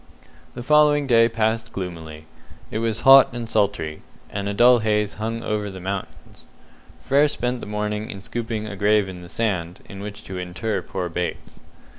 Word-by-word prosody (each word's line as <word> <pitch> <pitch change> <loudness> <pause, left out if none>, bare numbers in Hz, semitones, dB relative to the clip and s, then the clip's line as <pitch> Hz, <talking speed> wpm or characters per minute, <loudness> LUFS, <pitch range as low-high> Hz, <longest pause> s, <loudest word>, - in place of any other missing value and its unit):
The 120 - -6
following 150 +1 +4
day 115 -3 +5
passed 110 0 -1
gloomily. 80 -4 -7 0.5
It 110 - -2
was 115 -2 -1
hot 135 0 +8
and 120 -1 -5
sultry, 100 -8 -1 0.3
and 100 0 -3
a - - -2
dull 120 +2 +6
haze 105 -2 0
hung 115 +1 -3
over 105 -1 -2
the 95 -1 -8
mountains. 95 +1 -7 0.5
Frere 140 +3 +3
spent 125 -3 -2
the - - -7
morning 105 0 -3
in 100 -1 -8
scooping 115 -2 -4
a 105 -1 -6
grave 105 0 +2
in 90 -1 -8
the 90 - -11
sand, 90 -6 -2
in 100 - -9
which 100 0 -8
to 95 -1 -6
inter 95 +3 -3
poor 90 0 -4
Bates. 90 +1 -5
105 Hz, 175 wpm, -23 LUFS, 95-115 Hz, 0.5 s, hot